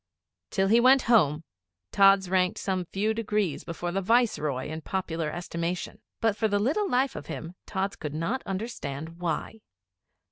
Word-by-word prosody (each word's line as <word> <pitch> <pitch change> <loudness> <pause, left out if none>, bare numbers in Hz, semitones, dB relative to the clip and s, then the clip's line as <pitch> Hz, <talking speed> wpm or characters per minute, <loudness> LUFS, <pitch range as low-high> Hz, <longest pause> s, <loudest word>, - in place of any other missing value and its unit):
Till 195 -1 +1
he 230 +3 +6
went 255 +2 +6
Home, 165 -10 +3 0.5
Tods 195 -1 +5
ranked 185 +3 +1
some 185 -2 -2
few 205 +5 -1
degrees 210 -7 -1
before 170 +1 -4
the 195 +2 -1
Viceroy 180 - +1
in 155 +1 -5
popular 165 -3 -2
estimation. 170 +1 -4 0.2
But 225 -3 +2
for 220 +1 +1
the 205 -1 +1
little 295 - +1
life 255 +2 +1
of 145 - -7
him 165 +2 -6
Tods 195 0 -2
could 150 -1 -5
not 195 - -1
understand 165 - -5
why. 175 +5 -3
190 Hz, 155 wpm, -27 LUFS, 165-220 Hz, 0.5 s, he